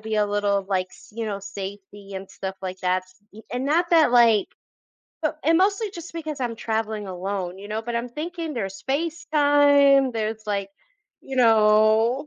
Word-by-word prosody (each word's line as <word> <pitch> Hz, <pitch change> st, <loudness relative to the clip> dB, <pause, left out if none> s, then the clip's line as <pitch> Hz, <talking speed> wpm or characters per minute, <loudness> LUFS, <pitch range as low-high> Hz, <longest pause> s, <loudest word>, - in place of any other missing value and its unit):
be 220 Hz, 0 st, -4 dB
a 210 Hz, -1 st, +2 dB
little 205 Hz, -1 st, 0 dB
like 185 Hz, -2 st, 0 dB
s -, -, -17 dB
you 225 Hz, 0 st, -4 dB
know, 200 Hz, -1 st, -4 dB
safety 200 Hz, 0 st, -9 dB
and 190 Hz, 0 st, -7 dB
stuff 190 Hz, 0 st, -6 dB
like 185 Hz, 0 st, -5 dB
that 185 Hz, 0 st, +1 dB
s 185 Hz, 0 st, -23 dB, 0.2 s
e 215 Hz, -, -12 dB
and 250 Hz, +2 st, -2 dB
not 335 Hz, +4 st, +1 dB
that 320 Hz, -7 st, +5 dB
like 230 Hz, -4 st, +5 dB, 0.7 s
but 310 Hz, -1 st, -2 dB
and 325 Hz, +3 st, +3 dB
mostly 400 Hz, +2 st, +1 dB
just 345 Hz, -3 st, -9 dB
because 315 Hz, -3 st, -5 dB
I'm 240 Hz, -2 st, -2 dB
traveling 220 Hz, -2 st, -3 dB
alone, 185 Hz, 0 st, -4 dB
you 200 Hz, -, -9 dB
know, 215 Hz, +1 st, -3 dB
but 235 Hz, +1 st, -3 dB
I'm 240 Hz, +1 st, -3 dB
thinking 325 Hz, +3 st, -5 dB
there's 195 Hz, -4 st, -5 dB
FaceTime, 285 Hz, -3 st, +3 dB
there's 220 Hz, -1 st, -3 dB
like, 200 Hz, -1 st, -2 dB, 0.5 s
you 270 Hz, -, -8 dB
know 220 Hz, +2 st, +4 dB
220 Hz, 180 wpm, -24 LUFS, 200-285 Hz, 0.7 s, that